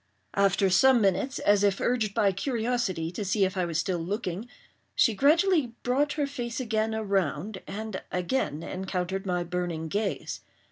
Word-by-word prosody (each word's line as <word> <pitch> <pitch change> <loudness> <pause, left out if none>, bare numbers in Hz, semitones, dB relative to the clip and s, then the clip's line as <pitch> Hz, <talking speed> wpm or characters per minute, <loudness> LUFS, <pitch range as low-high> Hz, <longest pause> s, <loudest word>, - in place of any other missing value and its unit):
After 195 0 +3
some 260 +7 +6
minutes, 215 +7 +1
as 205 0 +3
if 200 -1 +2
urged 225 -5 0
by 200 -2 +3
curiosity 220 - -1
to 205 - -4
see 195 +1 +2
if 190 +1 -3
I 185 -2 0
was 165 -2 -2
still 185 -2 0
looking, 195 +4 -3 0.5
she 230 - +4
gradually 305 - +3
brought 275 +4 +1
her 295 -2 0
face 240 -4 -4
again 220 -2 0
around 195 -2 -1
and 215 -1 -5
again 180 - -1
encountered 190 +1 -3
my 180 -1 0
burning 175 -2 -3
gaze. 205 +3 -2
200 Hz, 155 wpm, -28 LUFS, 185-240 Hz, 0.5 s, some